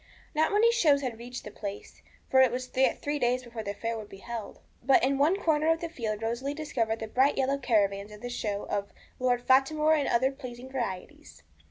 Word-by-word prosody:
Not 315 +1 +2
many 435 +3 +5
shows 300 -12 +3
had 235 -3 -4
reached 245 +1 -7
the 210 - -8
place, 200 -1 -8 0.3
for 260 - +5
it 260 -2 +5
was 255 +1 -4
yet 260 0 +3
three 290 0 -1
days 250 0 +1
before 235 -2 -7
the 200 -1 -5
fair 230 +2 -3
would 210 - -9
be 195 - -11
held. 230 +1 -7 0.2
But 260 +1 +4
in 270 +1 +2
one 330 +8 +3
corner 315 -2 +2
of 325 - +1
the 335 - -4
field 225 -8 -4
Rosalie 245 +5 -2
discovered 235 -8 -1
the 220 - -5
bright 265 +6 +2
yellow 275 +1 +1
caravans 200 -4 +1
of 210 0 -12
the 245 - -5
show 205 -4 -3
of 200 -1 -3 0.3
'Lord 245 -1 +1
Fatimore 305 +4 +4
and 295 -3 +1
other 260 +3 +2
Pleasing 255 -2 -9
Varieties.' 265 +5 -6
255 Hz, 215 wpm, -28 LUFS, 225-285 Hz, 0.3 s, many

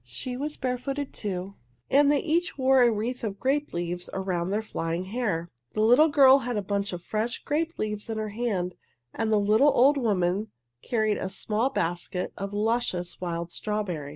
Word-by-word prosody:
She 125 - -5
was 295 +4 -4
barefooted, 265 +2 -3
too, 195 -2 -4 0.3
and 285 +1 +5
they 290 - +2
each 340 +2 0
wore 265 -1 +4
a 240 -1 +6
wreath 230 +4 -3
of 200 -3 -3
grape 285 +3 0
leaves 175 +1 -3
around 185 -2 -2
their 210 +3 -1
flying 165 -4 -3
hair. 190 -5 -2 0.3
The 215 - 0
little 245 +8 +6
girl 275 -3 +7
had 245 -3 -3
a 205 - -1
bunch 200 +1 -1
of 175 -1 -6
fresh 220 +5 -2
grape 320 +3 -1
leaves 210 0 -3
in 220 - -2
her 215 -1 -2
hand, 205 -5 -2 0.4
and 225 -1 -1
the 215 - +4
little 215 +8 +4
old 275 +4 +5
woman 200 -3 +1 0.3
carried 215 -3 0
a 190 - -3
small 220 +6 -1
basket 175 -2 -2
of 200 +1 -5
luscious 205 -5 -1
wild 170 -1 -3
strawberries. 185 -10 -3
215 Hz, 180 wpm, -27 LUFS, 185-255 Hz, 0.4 s, girl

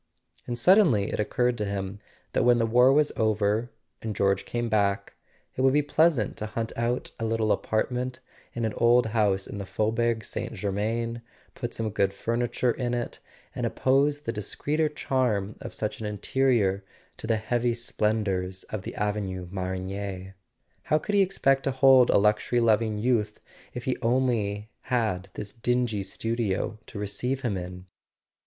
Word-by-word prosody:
And 120 - -3
suddenly 155 - +4
it - - -2
occurred 120 +3 +1
to 105 - 0
him 100 0 -4 0.3
that - - +2
when 120 -1 +5
the 115 - +2
war 125 +3 +5
was 150 +1 +3
over, 110 +1 +1 0.3
and 110 -2 -4
George 100 -1 +1
came 120 0 -2
back, 100 -2 0 0.4
it - - -2
would 135 0 +4
be 150 +1 +3
pleasant 145 -6 +2
to 110 - -4
hunt 115 +2 -4
out 120 +2 -1
a - - -3
little 110 -1 +1
apartment 125 +3 -1 0.4
in 120 -1 -1
an 110 - -1
old 120 +1 +5
house 100 -4 +2
in 100 - -7
the 100 - -4
Faubourg 115 +2 0
St. - - -4
Germain, 110 +4 -2 0.3
put 120 -2 -5
some 110 -1 -2
good 100 -1 +1
furniture 120 +3 0
in 120 0 -2
it, 120 - -4 0.3
and - - -4
oppose 140 +2 +2
the 115 -6 -3
discreeter 150 +8 -1
charm 120 -8 -1
of - - -6
such 105 - -4
an 105 - -2
interior 105 -2 +1 0.3
to - - -6
the 115 -1 +2
heavy 120 +2 0
splendours 105 -5 -1
of 110 - -3
the - - -7
Avenue 100 -4 -2
Marigny. 95 0 -4 0.5
How 155 - +3
could 205 - -4
he 200 - +5
expect 135 -8 +2
to - - +2
hold 130 -1 +6
a - - +5
luxury 105 +4 +2
loving 110 -2 +2
youth 110 -2 0 0.4
if - - -5
he - - 0
had - - -3
only 115 -4 0 0.6
this 105 - -5
dingy 120 -3 0
studio 110 +1 -2
to - - -9
receive 115 +6 -2
him 120 -6 -1
in 90 0 -6
110 Hz, 165 wpm, -27 LUFS, 100-125 Hz, 0.6 s, hold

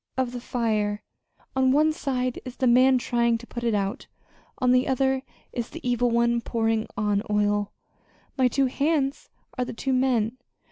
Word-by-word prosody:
of 255 -2 0
the 245 -1 -6
fire. 215 -4 -1 0.5
On 260 0 +3
one 305 +3 +3
side 255 -4 -2
is 255 -1 -8
the 260 - 0
man 255 +2 +5
trying 235 -1 +1
to 235 - -12
put 240 0 -7
it 230 -2 +1
out; 200 +5 -2 0.5
on 250 -2 +2
the 255 0 +3
other, 265 0 +1 0.3
is 240 -1 -3
the - - -7
evil 245 0 +2
one 235 0 +2
pouring 225 -1 0
on 205 -1 +1
oil. 205 -1 +1 0.6
My 260 -2 +3
two 270 +3 +1
hands 280 +1 0 0.3
are - - +2
the - - -6
two 265 +3 -2
men. 255 -3 +1
245 Hz, 175 wpm, -25 LUFS, 225-260 Hz, 0.6 s, man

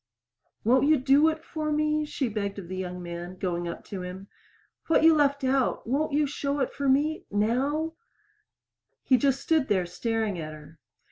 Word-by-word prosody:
"Won't 255 +5 +4
you 310 0 +5
do 280 +4 +4
it 315 0 -4
for 310 -1 -3
me?" 305 0 +1
she 280 -3 -2
begged 205 -2 -3
of 190 -4 -7
the 185 - -5
young 180 -1 -5
man, 175 +1 -7
going 175 -2 -2
up 170 - -6
to 195 -2 -6
him. 185 +2 -8 0.6
"What 325 - +3
you 325 0 +8
left 285 -2 +2
out 265 0 +1
won't 285 +6 0
you 295 +1 +2
show 285 0 -2
it 265 - -1
for 280 -1 -1
me 295 +4 +1
now?" 270 +10 0 1.1
He 260 - +4
just 275 0 +1
stood 315 -4 +2
there 190 -4 +1
staring 215 +2 -2
at 155 -1 -6
her. 155 +1 -14
260 Hz, 185 wpm, -27 LUFS, 185-295 Hz, 1.1 s, you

